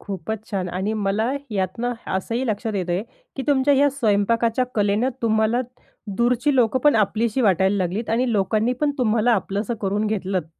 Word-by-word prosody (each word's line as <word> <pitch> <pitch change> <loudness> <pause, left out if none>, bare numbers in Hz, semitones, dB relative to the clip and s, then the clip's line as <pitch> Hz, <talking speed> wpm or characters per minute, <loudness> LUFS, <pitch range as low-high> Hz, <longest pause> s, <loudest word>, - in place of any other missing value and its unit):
खूपच 200 +2 -5
छान 190 -4 -2
आणि 190 +4 -2
मला 210 +3 0 0.2
यातनं 205 +5 -2 0.2
असंही 230 +7 -2
लक्षात 215 0 -2
येतंय 180 -1 -1 0.3
की 270 - -3
तुमच्या 285 0 +4
ह्या 280 +1 +4
स्वयंपाकाच्या 230 0 +1
कलेनं 210 +3 +1
तुम्हाला 220 +1 +2 0.6
दूरची 245 +5 +2
लोकं 245 +1 +3
पण 295 +2 +4
आपलीशी 220 +4 +1
वाटायला 190 -2 +3
लागलीत. 190 +5 -2
आणि 240 +1 +1
लोकांनी 215 +4 +1
पण 295 -1 +2
तुम्हाला 230 0 +2
आपलंसं 205 +2 -1
करून 205 +2 0
घेतलंत. 190 -5 -2
220 Hz, 155 wpm, -22 LUFS, 195-240 Hz, 0.6 s, तुमच्या